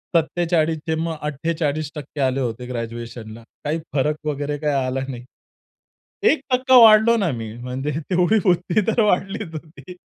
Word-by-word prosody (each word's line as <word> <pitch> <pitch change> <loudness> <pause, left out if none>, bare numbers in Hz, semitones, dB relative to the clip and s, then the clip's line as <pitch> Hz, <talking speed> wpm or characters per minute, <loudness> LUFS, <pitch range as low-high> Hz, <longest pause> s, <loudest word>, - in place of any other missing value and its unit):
47 165 -1 +1
चे 160 - +1
मग 165 0 -2
48% 150 -1 -3
आले 130 0 +1
होते 120 0 -3
ग्रॅज्युएशनला. 115 -1 -7 0.2
काही 155 +3 -1
फरक 150 +2 +1
वगैरे 145 0 -2
काही 150 -2 0
आला 130 +1 -2
नाही. 125 -2 -7 1.1
1 315 - 0
टक्का 255 +1 +4
वाढलो 220 +1 +7
ना 185 -8 0
मी. 115 -3 -5
म्हणजे 130 +4 -4 0.2
तेवढी 180 +4 +3
बुद्ध 180 +2 +2
तर 225 +1 +2
वाढलीच 195 -2 0
होती. 160 +3 -10
155 Hz, 145 wpm, -21 LUFS, 130-180 Hz, 1.1 s, वाढलो